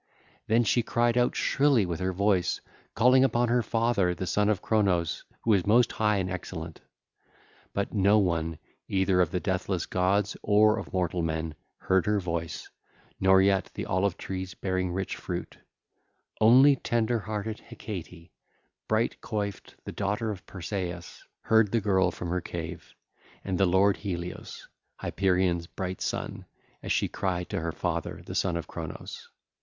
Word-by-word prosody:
Then 115 +2 +4
she 120 +3 +2
cried 120 +1 +1
out 125 0 +2
shrilly 135 -7 +3
with 85 -2 -3
her 95 0 0
voice, 95 -1 +1 0.4
calling 125 +3 +5
upon 120 -2 +2
her 120 +1 +3
father, 115 -6 +1
the 95 - -4
Son 105 +3 +1
of 105 - +1
Cronos, 95 -6 +1 0.2
who 115 - +3
is 95 -2 +1
most 120 +3 +5
high 105 -1 +1
and 95 -2 -1
excellent. 85 -3 -6 0.9
But 100 - -2
no 100 0 +4
one, 85 -5 0 0.3
either 95 -1 +2
of 90 - +2
the 90 - -1
deathless 95 -2 -1
gods 100 +2 +1
or 105 +1 +4
of - - -8
mortal 90 -1 0
men, 80 -1 -2 0.2
heard 95 0 +1
her 105 -1 +2
voice, 85 -3 -4 0.5
nor 95 0 +5
yet 95 -1 +2
the - - -4
olive 95 0 0
trees 95 -1 -5
bearing 95 -1 -1
rich 95 +2 -3
fruit: - - -6 0.8
only 130 +6 +7
tender 120 -1 0
hearted 110 +1 -4
Hecate, 90 -4 -9 0.6
bright 110 +2 0
coiffed, 100 -3 -4
the - - -5
daughter 105 +3 -1
of 95 -3 -9
Persaeus, 90 -2 -5 0.2
heard 110 -3 +3
the 115 - +2
girl 95 -3 +2
from 90 0 -6
her 90 0 0
cave, 85 -1 -7 0.5
and 95 -1 -2
the 95 - +4
lord 95 +2 +4
Helios, 90 -3 -6 0.3
Hyperion's 90 -3 0
bright 95 -1 -5
son, - - -4 0.3
as - - -4
she - - +2
cried 90 -2 -2
to - - -2
her 85 0 -2
father, - - -3
the - - -7
Son 90 -3 0
of 85 - -4
Cronos. - - -8
95 Hz, 160 wpm, -28 LUFS, 90-110 Hz, 0.9 s, only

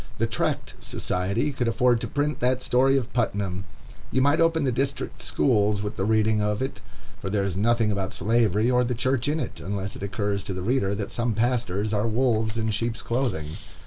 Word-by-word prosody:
The - - +1
Tract - - -1
Society 100 +10 -1
could 125 -3 -1
afford 120 0 +3
to - - -2
print 150 +1 -1
that 125 +1 +1
story 135 +2 +3
of 125 -3 -3
Putnam. 100 -6 -1 0.4
You 130 - +1
might 145 +5 +3
open 165 -1 +3
the 130 - +2
district 135 +3 -2
schools 105 -5 +2
with 105 +1 -4
the 95 - -1
reading 110 0 +3
of 105 0 0
it, 135 - -5 0.4
for 95 - -4
there 100 0 +1
is 100 -3 -2
nothing 110 +2 +2
about 95 -2 -2
Slavery 115 0 +2
or 125 0 +4
the 125 0 -1
Church 130 +2 0
in 150 +2 +1
it; - - -5
unless 100 0 -4
it - - -9
occurs 100 0 -2
to 95 - -4
the 90 - -4
reader 100 -3 +1
that 100 -1 -4
some 120 -2 -1
pastors 110 -3 0
are 105 +2 +1
wolves 110 -2 +1
in 110 -1 0
sheep's 115 +2 -2
clothing. 115 - -1
115 Hz, 205 wpm, -25 LUFS, 100-125 Hz, 0.4 s, or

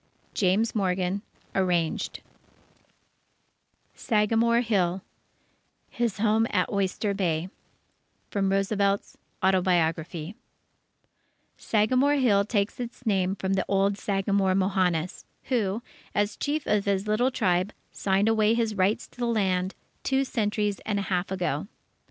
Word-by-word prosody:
James 205 +4 +2
Morgan 185 -1 0 0.3
(Arranged) 175 -4 0 1.7
SAGAMORE 230 +1 +2
HILL 190 -5 0 0.9
His 235 -4 -1
Home 220 +1 +2
at 185 -2 0
Oyster 200 +1 0
Bay 175 -3 -1 0.8
From 195 -1 +1
Roosevelt's 200 0 0 0.3
Autobiography 175 -2 +1 1.2
Sagamore 255 +7 +2
Hill 225 -8 +3
takes 205 0 -1
its 245 +1 -7
name 190 -3 +1
from 190 0 -2
the 190 - 0
old 195 0 +2
Sagamore 195 -1 +1
Mohannis, 185 -3 0 0.3
who, 225 -3 0 0.3
as 205 0 +1
Chief 295 +1 -2
of 210 -1 +1
his 200 0 0
little 225 +5 +2
tribe, 185 -6 +1 0.2
signed 195 +1 +1
away 220 0 +3
his 230 -2 0
rights 200 +1 +1
to - - -21
the 240 - 0
land, 190 -4 0 0.3
two 270 0 +1
centuries 210 -4 -1
and 210 -2 -1
a 200 - -1
half 180 0 0
ago. 175 -4 -2
200 Hz, 115 wpm, -26 LUFS, 185-220 Hz, 1.7 s, Hill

